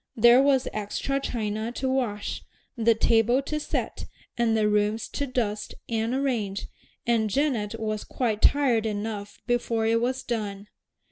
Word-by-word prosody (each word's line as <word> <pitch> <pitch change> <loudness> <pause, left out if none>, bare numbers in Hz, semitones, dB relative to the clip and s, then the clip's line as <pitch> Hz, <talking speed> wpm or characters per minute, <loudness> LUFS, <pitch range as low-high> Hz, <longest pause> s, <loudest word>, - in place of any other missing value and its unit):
There 240 +2 +7
was 275 -2 +3
extra 215 +6 -2
china 220 -3 -2
to 265 - -2
wash, 245 -6 -1 0.3
the 230 -1 +3
table 225 +3 +3
to 305 +2 -2
set, - - -3 0.3
and 230 -2 +2
the 215 -1 +3
rooms 210 +1 +1
to 285 - -3
dust 225 -5 -2
and 225 +1 -1
arrange, 230 -8 -1 0.4
and 230 -2 +2
Janet 225 -4 0
was 215 -1 -2
quite 225 -5 -2
tired 250 -6 +4
enough 205 -1 -4
before 235 -2 0
it 230 +1 +2
was 255 +2 -1
done. 210 -3 -4
225 Hz, 145 wpm, -26 LUFS, 210-250 Hz, 0.4 s, There